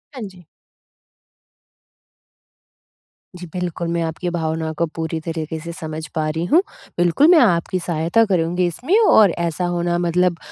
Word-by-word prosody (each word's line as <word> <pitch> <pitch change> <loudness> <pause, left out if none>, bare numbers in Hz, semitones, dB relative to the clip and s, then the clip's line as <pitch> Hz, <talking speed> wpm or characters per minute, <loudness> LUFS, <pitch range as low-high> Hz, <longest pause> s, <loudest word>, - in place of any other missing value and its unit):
हाँ 255 - -7
जी। 185 -2 -15 2.9
जी 180 - -8
बिल्कुल, 175 -1 -3
मैं 170 0 -1
आपकी 165 +2 -3
भावनाओं 160 -2 -2
को 170 - +1
पूरी 160 0 -3
तरीक़े 160 -1 -4
से 170 +2 -7
समझ 160 -1 -6
पा 155 -1 0
रही 160 +2 -2
हूँ, 325 - +4 0.4
बिल्कुल 175 - +3
मैं 340 - +7
आपकी 185 - +2
सहायता 170 +5 +1
करूँगी 180 -2 0
इसमें 255 - 0
और 215 - +6
ऐसा 170 +1 -1
होना 175 0 -1
मतलब 175 0 +1
170 Hz, 145 wpm, -20 LUFS, 160-180 Hz, 2.9 s, मैं